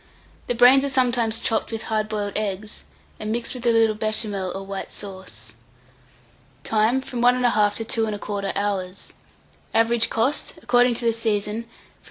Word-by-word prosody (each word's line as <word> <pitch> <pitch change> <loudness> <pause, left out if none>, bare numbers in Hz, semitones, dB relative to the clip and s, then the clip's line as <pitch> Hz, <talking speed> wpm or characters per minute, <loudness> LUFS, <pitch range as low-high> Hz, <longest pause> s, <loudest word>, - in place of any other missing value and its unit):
The 245 - -1
brains 250 +3 +6
are 280 - 0
sometimes 240 -4 +2
chopped 225 0 -1
with 225 -1 -4
hard 215 -1 -2
boiled 205 -2 -3
eggs, 210 0 -4 0.3
and 215 0 -4
mixed 235 +1 -2
with 250 -1 -4
a - - +5
little 225 -1 +3
Béchamel 210 -4 -2
or 195 0 -6
white 195 0 -6
sauce. 115 - -8 1.1
Time. 225 - +2
From 250 -2 -5
1 245 +1 +4
1/2 210 -4 +2
to 225 - -2
2 225 0 +1
1/4 205 -1 -3
hours. 195 -2 -3 0.6
Average 230 0 +3
cost, 245 +6 0
according 245 0 +3
to 235 - -3
the 230 - +3
season, 215 -1 -1
from - - -29
3s. 230 - -26
220 Hz, 170 wpm, -23 LUFS, 205-235 Hz, 1.1 s, brains